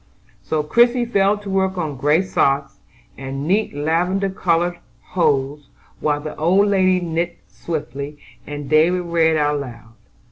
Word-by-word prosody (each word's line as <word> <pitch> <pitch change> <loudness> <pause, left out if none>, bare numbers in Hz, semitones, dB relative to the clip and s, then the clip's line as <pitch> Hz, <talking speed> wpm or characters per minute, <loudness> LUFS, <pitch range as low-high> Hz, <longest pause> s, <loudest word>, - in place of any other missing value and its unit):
So 155 -1 -1
Christie 240 +8 +3
fell 200 -3 +2
to 205 -1 -9
work 190 0 0
on 155 -5 -2
gray 150 +7 +2
socks, 140 -6 0 0.4
and 135 +2 -5
neat 200 -2 +1
lavender 180 +6 0
colored 175 -1 0 0.3
hose, 145 -4 0 0.3
while 145 -1 0
the 155 0 -6
old 190 +6 +3
lady 185 -2 +3
knit 170 0 -2
swiftly, 145 -3 -6 0.3
and 145 -1 -6
David 160 +5 +3
read 165 -2 +2
aloud. 140 -6 -3
165 Hz, 135 wpm, -20 LUFS, 145-185 Hz, 0.4 s, Christie